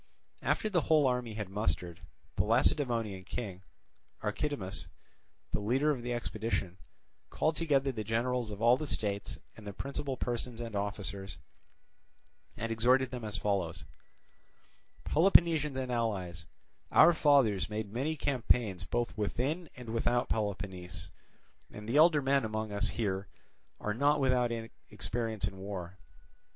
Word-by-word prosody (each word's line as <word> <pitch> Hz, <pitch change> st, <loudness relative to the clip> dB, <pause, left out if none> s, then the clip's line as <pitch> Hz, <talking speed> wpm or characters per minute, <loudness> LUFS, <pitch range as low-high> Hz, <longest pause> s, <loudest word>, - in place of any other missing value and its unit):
After -, -, +1 dB
the 185 Hz, -5 st, +2 dB
whole 155 Hz, -2 st, +4 dB
army 125 Hz, -3 st, 0 dB
had 105 Hz, -3 st, -4 dB
mustered, 90 Hz, -3 st, -2 dB, 0.4 s
the -, -, +2 dB
Lacedaemonian 115 Hz, -4 st, +1 dB
king, 95 Hz, -2 st, -5 dB, 0.6 s
Archidamus, 105 Hz, -2 st, -3 dB, 0.6 s
the -, -, 0 dB
leader 130 Hz, +9 st, +2 dB
of 130 Hz, -5 st, -2 dB
the 120 Hz, +1 st, -4 dB
expedition, 110 Hz, -5 st, -2 dB, 0.5 s
called 155 Hz, 0 st, 0 dB
together 140 Hz, -5 st, +2 dB
the 110 Hz, -4 st, -4 dB
generals 115 Hz, +2 st, 0 dB
of 105 Hz, +1 st, -6 dB
all 120 Hz, +2 st, +6 dB
the 155 Hz, -, -4 dB
states 100 Hz, -5 st, -3 dB, 0.2 s
and 110 Hz, -2 st, -11 dB
the 100 Hz, -, -5 dB
principal 140 Hz, +3 st, -4 dB
persons 120 Hz, -1 st, -3 dB
and 115 Hz, -3 st, -5 dB
officers, 100 Hz, -2 st, -3 dB, 1.2 s
and 115 Hz, +1 st, -3 dB
exhorted 125 Hz, +3 st, +3 dB
them 125 Hz, -2 st, -5 dB
as 105 Hz, 0 st, -2 dB
follows: 95 Hz, -6 st, -1 dB, 1.2 s
"Peloponnesians 160 Hz, -4 st, +4 dB
and 130 Hz, -1 st, -2 dB
allies, 95 Hz, -7 st, -2 dB, 0.4 s
our 170 Hz, +2 st, +8 dB
fathers 130 Hz, -, +4 dB
made 105 Hz, -1 st, -4 dB
many 140 Hz, +7 st, -1 dB
campaigns 120 Hz, -, +1 dB
both 120 Hz, +3 st, -1 dB
within 135 Hz, -, -1 dB
and 125 Hz, -2 st, -9 dB
without 120 Hz, +1 st, +1 dB
Peloponnese, 95 Hz, -4 st, -3 dB, 0.6 s
and 105 Hz, 0 st, -9 dB
the 120 Hz, +5 st, +1 dB
elder 155 Hz, -2 st, +6 dB
men 135 Hz, 0 st, +3 dB
among 110 Hz, -1 st, -3 dB
us 100 Hz, +1 st, +1 dB
here 100 Hz, -3 st, -1 dB, 0.5 s
are 105 Hz, -, -1 dB
not 145 Hz, +6 st, +3 dB
without 125 Hz, -3 st, +2 dB, 0.4 s
experience 110 Hz, -4 st, -1 dB
in 95 Hz, -1 st, -7 dB
war. 95 Hz, -2 st, -6 dB
115 Hz, 135 wpm, -32 LUFS, 100-130 Hz, 1.2 s, our